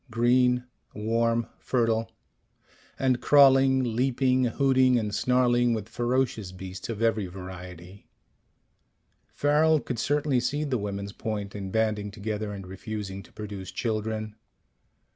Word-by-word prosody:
Green, 125 Hz, +2 st, +3 dB, 0.3 s
warm, 115 Hz, +2 st, +1 dB
fertile 115 Hz, -2 st, 0 dB, 0.9 s
and 130 Hz, -2 st, +1 dB
crawling, 135 Hz, -2 st, +5 dB
leaping, 130 Hz, +1 st, +2 dB
hooting 130 Hz, 0 st, +3 dB
and 105 Hz, -3 st, -2 dB
snarling 120 Hz, +1 st, +2 dB
with 110 Hz, -2 st, -5 dB
ferocious 120 Hz, -4 st, -1 dB
beasts 95 Hz, +2 st, -8 dB
of 115 Hz, -1 st, -3 dB
every 110 Hz, -4 st, +1 dB
variety. 90 Hz, 0 st, -10 dB, 1.2 s
Farrel 155 Hz, +2 st, +3 dB
could 125 Hz, -4 st, -5 dB
certainly 145 Hz, 0 st, +1 dB
see 145 Hz, +5 st, -1 dB
the 135 Hz, -5 st, -1 dB
women's 100 Hz, 0 st, -4 dB
point 105 Hz, -3 st, -4 dB
in 100 Hz, -2 st, -5 dB
banding 105 Hz, -1 st, 0 dB
together 105 Hz, 0 st, -4 dB
and 100 Hz, -2 st, -7 dB
refusing 95 Hz, +1 st, -6 dB
to 90 Hz, -, -18 dB
produce 105 Hz, -3 st, -7 dB
children. 110 Hz, -1 st, -3 dB
115 Hz, 120 wpm, -27 LUFS, 105-125 Hz, 1.2 s, crawling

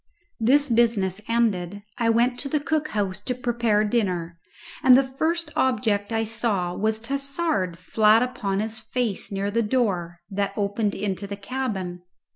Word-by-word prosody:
This 275 Hz, +6 st, +4 dB
business 225 Hz, -5 st, +2 dB
ended, 205 Hz, -4 st, 0 dB, 0.2 s
I 230 Hz, -1 st, +2 dB
went 240 Hz, +2 st, +2 dB
to 275 Hz, -, -3 dB
the 300 Hz, -, +1 dB
cook 305 Hz, +1 st, -1 dB
house 200 Hz, -4 st, -2 dB
to 250 Hz, +4 st, -2 dB
prepare 235 Hz, -4 st, +1 dB
dinner, 180 Hz, -7 st, -1 dB, 0.4 s
and 255 Hz, -1 st, +7 dB
the 270 Hz, -, +4 dB
first 315 Hz, +5 st, -2 dB
object 215 Hz, -5 st, +1 dB
I 225 Hz, 0 st, +1 dB
saw 210 Hz, -5 st, -1 dB
was 220 Hz, +3 st, 0 dB
Tassard 275 Hz, -, -1 dB
flat 215 Hz, +6 st, +4 dB
upon 210 Hz, -6 st, -2 dB
his 220 Hz, +1 st, -4 dB
face 230 Hz, -3 st, -3 dB
near 200 Hz, +1 st, -2 dB
the 230 Hz, +2 st, +1 dB
door 200 Hz, -8 st, 0 dB
that 200 Hz, 0 st, -1 dB
opened 205 Hz, 0 st, 0 dB
into 200 Hz, -1 st, -3 dB
the 200 Hz, 0 st, -6 dB
cabin. 200 Hz, -6 st, -4 dB
220 Hz, 155 wpm, -24 LUFS, 200-250 Hz, 0.4 s, and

